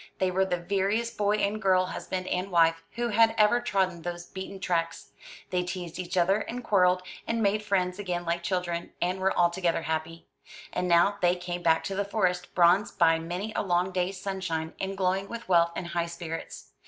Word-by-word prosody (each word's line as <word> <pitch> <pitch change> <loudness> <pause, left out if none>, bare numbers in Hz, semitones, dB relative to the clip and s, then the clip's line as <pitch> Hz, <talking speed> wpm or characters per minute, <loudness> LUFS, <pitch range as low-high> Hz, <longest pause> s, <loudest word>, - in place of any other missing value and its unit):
They 185 -1 +1
were 190 +1 +2
the 180 -2 -1
veriest 200 +6 -1
boy 205 0 +2
and 210 +1 -1
girl 185 -1 +3
husband 185 0 -4
and 185 +1 -2
wife 165 -2 +3
who 240 0 -1
had 225 +1 +4
ever 215 +3 +4
trodden 190 -7 0
those 175 0 -5
beaten 190 +1 -8
tracks. 165 -3 -2 0.4
They 180 -1 +1
teased 180 -1 -5
each 180 0 -4
other, 185 +3 +4
and 245 +3 -5
quarrelled, 180 -3 +3 0.2
and 230 -1 0
made 205 +1 +2
friends 190 -2 0
again 175 -3 -3
like 170 +1 -1
children, 175 -2 -2
and 180 +2 -1
were 190 0 +1
altogether 175 -1 +2
happy. 160 +1 -3 0.5
And 180 - -1
now 180 +4 +4
they 175 0 +4
came 175 0 -5
back 165 -1 +3
to 195 - -3
the 200 - 0
Forest, 180 -3 -1
bronzed 180 +3 +4
by 165 -1 +4
many 180 +6 -4
a - - +1
long 180 -1 +1
day's 185 +1 -2
sunshine, 180 -5 -3
and 195 0 -3
glowing 190 +1 0
with 235 0 -6
health 170 -2 +4
and 180 - -4
high 170 0 -1
spirits. 170 -1 -7
185 Hz, 195 wpm, -28 LUFS, 175-195 Hz, 0.5 s, had